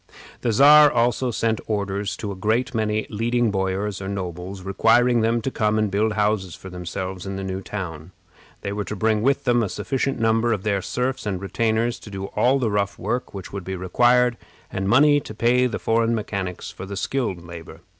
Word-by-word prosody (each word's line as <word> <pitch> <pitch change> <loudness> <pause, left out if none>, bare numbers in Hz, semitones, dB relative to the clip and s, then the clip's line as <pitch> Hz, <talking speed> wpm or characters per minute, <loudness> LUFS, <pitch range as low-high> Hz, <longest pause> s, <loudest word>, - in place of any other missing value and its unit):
The 120 - +1
Czar 145 +5 +7
also 120 +2 +1
sent 110 -1 0
orders 100 -2 -2
to 105 - -4
a - - -5
great 110 +6 0
many 110 -1 0
leading 115 +1 +1
boyars 95 +1 -2
or 95 - -5
nobles, 95 0 -5
requiring 115 +5 +3
them 115 +1 +1
to 135 - -2
come 110 -2 +1
and 110 -2 +1
build 105 +2 +1
houses 105 -4 0
for 95 - -11
themselves 90 +1 -5
in 95 - -4
the 95 - -4
new 95 0 -4
town. 90 -5 -6 0.5
They 100 - -3
were 105 0 -2
to 105 - -5
bring 110 +1 +1
with 135 +4 +2
them 120 -1 +3
a 105 - -1
sufficient 135 +7 -2
number 115 +1 +2
of 100 -3 -3
their 100 -2 0
serfs 125 +3 -2
and 95 -3 -2
retainers 115 +4 0
to - - -11
do 95 -1 -5
all 125 +6 +3
the 120 -5 0
rough 100 -1 -1
work 125 -4 -3
which 95 -1 -8
would 100 -2 -5
be 95 +2 -4
required, 120 +6 +3 0.3
and 95 +1 -2
money 145 +5 +5
to 110 - -9
pay 125 +3 +3
the 120 - -3
foreign 115 +1 +1
mechanics 100 -4 -4
for 95 - -9
the 100 0 -6
skilled 100 -7 -2
labor. 85 -1 -10
105 Hz, 205 wpm, -23 LUFS, 95-120 Hz, 0.5 s, Czar